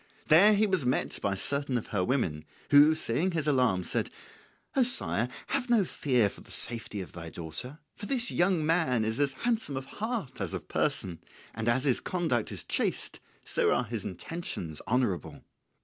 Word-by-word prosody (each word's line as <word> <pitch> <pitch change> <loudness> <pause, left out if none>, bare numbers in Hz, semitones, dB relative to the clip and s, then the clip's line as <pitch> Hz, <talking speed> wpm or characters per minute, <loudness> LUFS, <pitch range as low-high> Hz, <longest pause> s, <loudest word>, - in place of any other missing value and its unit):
There 200 +7 +7
he 215 +2 +3
was 190 -7 0
met 125 +1 -1
by 100 -1 -1
certain 140 +5 0
of 115 - -6
her 95 -3 -1
women, 90 - -1 0.3
who, 145 +2 +7
seeing 155 +5 0
his 160 -3 -1
alarm, 125 -10 +2
said, - - -2 0.7
"O 270 - +3
sire, 180 - +3 0.2
have 265 -2 -1
no 225 -5 +3
fear 125 -10 +1
for - - -10
the - - -15
safety 115 -3 +4
of 90 - -9
thy 85 -1 -8
daughter; 85 - -5 0.2
for 205 - -8
this 255 -3 0
young 175 -3 +1
man 150 -9 +2
is 110 +3 -2
as 140 -2 +2
handsome 225 - -1
of 135 - -5
heart 215 - -5
as 95 -5 -3
of - - -7
person, 90 -4 -1 0.3
and 115 +1 -2
as 130 +2 +1
his 135 -4 +2
conduct 160 - -2
is - - -4
chaste, - - -2 0.2
so - - 0
also 125 - +2
are - - -17
his 115 -5 -3
intentions 90 - -5
honourable." 110 - -1
130 Hz, 185 wpm, -29 LUFS, 110-175 Hz, 0.7 s, There